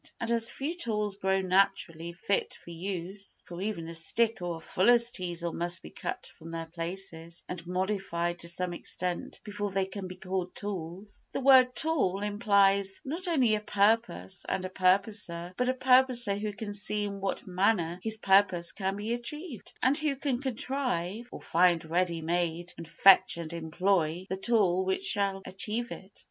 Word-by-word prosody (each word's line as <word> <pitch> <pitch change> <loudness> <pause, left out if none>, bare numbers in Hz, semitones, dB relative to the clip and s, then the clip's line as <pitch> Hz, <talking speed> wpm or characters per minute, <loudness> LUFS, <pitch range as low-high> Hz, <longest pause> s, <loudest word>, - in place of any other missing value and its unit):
And 230 - -2
as 230 -1 +3
few 290 +5 -3
tools 210 - -1
grow 190 -1 +1
naturally 185 -3 +1
fit 195 +3 -1
for 170 - -12
use 190 +3 -5
(for 175 +1 -8
even 195 -5 -3
a 165 - -6
stick 225 +7 0
or 175 -1 -2
a - - -8
fuller's 235 +8 +3
teasel 175 -3 -3
must 175 0 -1
be 75 - -10
cut - - -5
from 165 - -10
their 165 0 -4
places 170 0 -6
and 175 -1 -7
modified 180 -2 -1
to 170 - -5
some 175 +1 -2
extent 180 0 -3
before 205 -1 -4
they 195 0 0
can 190 0 -6
be 185 - -8
called 185 -1 -4
tools), 195 0 -6
the - - -1
word 260 -2 +6
"tool" 255 - +2
implies 200 -2 +3
not 335 +7 -3
only 265 -10 +3
a 215 - +2
purpose 205 - +1
and 190 -1 -1
a - - -4
purposer, 185 -2 0
but 250 +4 0
a - - +3
purposer 255 -4 +4
who 210 +1 -3
can 205 0 -6
see 210 +1 0
in 200 -1 -5
what 195 - -2
manner 180 -2 +1
his 220 +2 +2
purpose 190 -4 +3
can 195 -1 -2
be 210 +3 -2
achieved, 250 - -5
and 265 +3 +4
who 305 -2 +1
can 270 -2 -1
contrive 240 -5 -2
(or - - -9
find 170 -1 +3
ready 170 0 0
made 175 +1 -1
and 165 -1 -9
fetch 190 -1 +6
and 170 -1 -6
employ) 170 +1 0
the - - +1
tool 195 -4 +2
which 190 0 -1
shall 195 -1 +1
achieve 210 +5 -1
it. 190 +1 -10
195 Hz, 175 wpm, -29 LUFS, 175-215 Hz, -, word